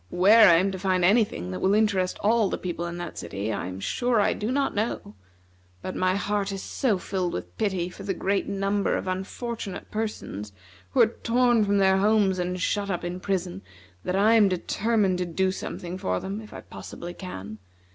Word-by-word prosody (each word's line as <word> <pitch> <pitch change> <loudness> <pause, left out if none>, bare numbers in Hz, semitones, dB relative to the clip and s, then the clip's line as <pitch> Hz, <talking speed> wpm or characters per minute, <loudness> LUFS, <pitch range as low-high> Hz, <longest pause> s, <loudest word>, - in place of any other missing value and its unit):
Where 205 - +7
I 170 - +7
am 190 +4 +2
to 190 - -5
find 185 -2 +2
any 220 +5 +5
thing 90 - -6
that 90 - -4
will 195 +2 +3
interest 200 -4 +1
all 220 -1 +3
the - - -2
people 175 -1 -4
in 170 0 -6
that 175 -2 -6
city, 100 +3 -4
I 90 - -3
am 95 +1 -6
sure 240 - 0
I 205 - +3
do 215 +4 -3
not 275 +1 0
know; 205 - -3 0.7
but 185 - -4
my 185 0 +1
heart 200 0 -1
is 195 -1 -5
so 230 -7 0
filled 185 -1 -2
with 90 0 -6
pity 190 -4 0
for 180 +2 -11
the 195 -1 -2
great 195 +3 0
number 200 0 0
of - - -5
unfortunate 195 +3 -5
persons 160 - -4 0.4
who - - +3
are - - +8 0.2
torn 240 -1 +3
from 200 0 +2
their 190 -1 +4
homes 200 -2 +3
and 180 +1 -2
shut 200 +2 -1
up 175 -3 -2
in 175 +1 -4
prison, 185 -1 -2 0.4
that 180 - -1
I 210 +3 +4
am 215 -3 +6
determined 195 +1 0
to 180 - 0
do 185 +3 +1
something 180 -1 -6
for 90 - -1
them, 200 +3 -5
if 215 - -13
I - - -8
possibly 175 +1 -9
can. 110 - -8
190 Hz, 205 wpm, -26 LUFS, 180-210 Hz, 0.7 s, are